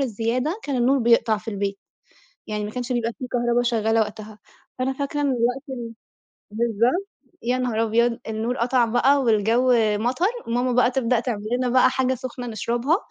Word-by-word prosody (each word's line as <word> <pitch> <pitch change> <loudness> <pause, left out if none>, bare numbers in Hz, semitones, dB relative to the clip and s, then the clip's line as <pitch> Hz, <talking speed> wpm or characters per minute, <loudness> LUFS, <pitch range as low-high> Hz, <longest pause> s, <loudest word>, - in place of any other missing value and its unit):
الزيادة 250 - -1
كان 280 -3 -2
النور 260 +3 +3
بيقطع 230 -2 +3
في 215 +2 -12
البيت، 200 -1 -3 0.7
يعني 210 -1 -3
ما 210 - -6
كانش 250 +1 -4
يبقى 235 -2 0
في 255 - -5
كهربا 240 0 +1
شغالة 225 -2 +1
وقتها، 215 0 -6 0.4
فأنا 265 +1 0
فاكرة 290 +2 -3
إن - - +1
الوقت 250 +1 0
ب 240 -3 -6 0.6
بالضبط، 235 - 0 0.3
يا 245 +2 0
نهار 240 -3 0
أبيض! 230 +1 +1
النور 225 +3 -2
قطع 245 +1 +2
بقى 265 +5 +3
والجو 230 +2 +3 0.3
مطر، 255 - 0 0.2
ماما 245 +2 0
بقى 245 0 +3
تبدأ 250 -2 +1
تعمل 235 -4 -3 0.2
لنا 255 -1 0
بقى 255 +1 +4
حاجة 260 0 0
سخنة 250 0 -7
نشربها، 240 - 0
240 Hz, 170 wpm, -23 LUFS, 225-255 Hz, 0.7 s, بقى